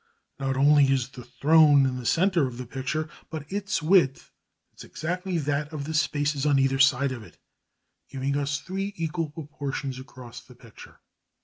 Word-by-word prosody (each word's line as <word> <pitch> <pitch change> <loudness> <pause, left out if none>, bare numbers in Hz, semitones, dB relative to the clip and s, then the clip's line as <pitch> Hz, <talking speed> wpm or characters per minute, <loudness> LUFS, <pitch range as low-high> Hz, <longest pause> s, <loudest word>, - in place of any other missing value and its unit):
Not 135 -1 -1
only 145 +1 +5
is 135 -1 0
the 130 -2 -11
throne 150 -1 +5
in 130 -1 -1
the 120 - -5
centre 170 0 +2
of 120 -2 -8
the 125 - -6
picture, 135 +5 -3 0.2
but 155 -3 -6
its 200 -4 -2
width 160 -5 +2 0.4
is - - -11
exactly 180 +2 -3
that 145 0 -2
of 150 -3 -5
the 160 +3 -5
spaces 150 -2 0
on 145 -2 +3
either 135 0 +2
side 140 0 +4
of 125 -3 -6
it, 110 - -15 0.7
giving 135 +1 -2
us 145 +1 -1
three 195 +3 -5
equal 165 -1 -2
proportions 140 -3 -5
across 130 -2 -11
the 125 - -17
picture. 115 -2 -15
145 Hz, 175 wpm, -26 LUFS, 135-160 Hz, 0.7 s, only